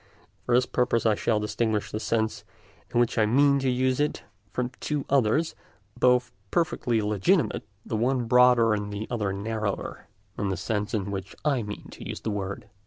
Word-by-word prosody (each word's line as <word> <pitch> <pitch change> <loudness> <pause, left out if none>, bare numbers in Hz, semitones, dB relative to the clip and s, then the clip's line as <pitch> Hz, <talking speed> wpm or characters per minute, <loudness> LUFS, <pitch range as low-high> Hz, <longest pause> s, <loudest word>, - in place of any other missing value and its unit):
For 120 - +3
this 125 0 +4
purpose 120 -3 +1
I 110 - +5
shall 110 +1 +1
distinguish 105 0 -1
the 110 - -3
sense 110 -1 -1 0.5
in 120 - +2
which 120 -1 +2
I 105 - +4
mean 140 +4 +4
to 135 -1 +1
use 130 +1 +1
it 150 0 0 0.3
from 125 +2 -2
two 150 -2 -2
others, 140 +5 +2 0.4
both 125 0 +3 0.2
perfectly 125 - +1
legitimate, 105 - +1 0.2
the - - -3
one 125 +2 +1
broader 125 -1 +5
and 105 -1 -2
the 105 +2 -4
other 105 -5 -1
narrower 105 +1 -3 0.3
than 100 - -1
the 95 - -1
sense 105 0 -2
in 100 -1 -2
which 95 -1 -5
I 140 -5 +2
mean 105 -1 -7
to - - -10
use - - -5
the 110 - -2
word. 100 0 -4
115 Hz, 180 wpm, -26 LUFS, 105-125 Hz, 0.5 s, I